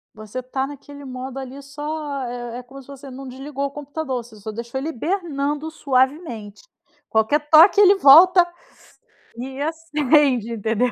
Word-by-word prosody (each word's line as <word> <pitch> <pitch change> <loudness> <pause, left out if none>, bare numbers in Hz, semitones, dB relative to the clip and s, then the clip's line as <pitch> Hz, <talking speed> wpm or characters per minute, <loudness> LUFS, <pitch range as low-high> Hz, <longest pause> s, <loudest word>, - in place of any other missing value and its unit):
Você 215 +4 -7
tá 265 +1 -3
naquele 285 0 -11
modo 260 +1 -7
ali 265 +1 -8
só 295 0 -5
é 240 0 -6
é - - -10
como 265 +3 -13
se 260 - -20
você 280 0 -11
não 265 +1 -9
desligou 275 +2 -5
o 280 - -4
computador, 290 -3 -5
você 230 -1 -16
só 215 +1 -7
deixa 235 +3 -6
ele 275 +4 -3
hibernando 310 - -3
suavemente. 260 - -1 0.5
Qualquer 220 +7 +2
toque, 345 +6 +7
ele 400 0 +7
volta 350 +3 +7 0.9
e 265 +3 -6
acende, 295 -6 +1
entendeu. 225 +3 0
275 Hz, 155 wpm, -21 LUFS, 250-300 Hz, 0.9 s, toque